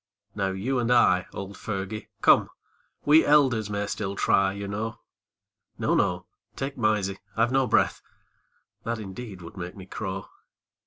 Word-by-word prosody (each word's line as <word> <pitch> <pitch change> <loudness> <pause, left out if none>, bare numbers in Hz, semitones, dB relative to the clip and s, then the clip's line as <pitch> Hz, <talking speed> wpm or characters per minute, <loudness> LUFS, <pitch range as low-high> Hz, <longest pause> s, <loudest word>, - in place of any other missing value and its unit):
Now 100 -2 -1
you 110 +8 -1
and 120 -1 0
I, 95 -7 +4
old 100 +1 -7
Fergie, 100 0 -4 0.2
come, - - +6 0.6
We 155 +2 +7
elders 130 -8 +4
may 100 0 -1
still 100 -1 -3
try, 95 0 +3
you 100 +1 -5
know, 105 +3 -3 0.8
No, - - +1
no! - - +1 0.3
take 135 +1 -4
Mysie, 105 -4 0 0.2
I've 115 +2 +3
no 135 -1 +3
breath, - - +2 0.8
That 115 0 -2
indeed 100 -2 -8
would 85 - -11
make 90 +1 -6
me 95 -2 -10
crow 95 0 -5
105 Hz, 150 wpm, -26 LUFS, 95-120 Hz, 0.8 s, We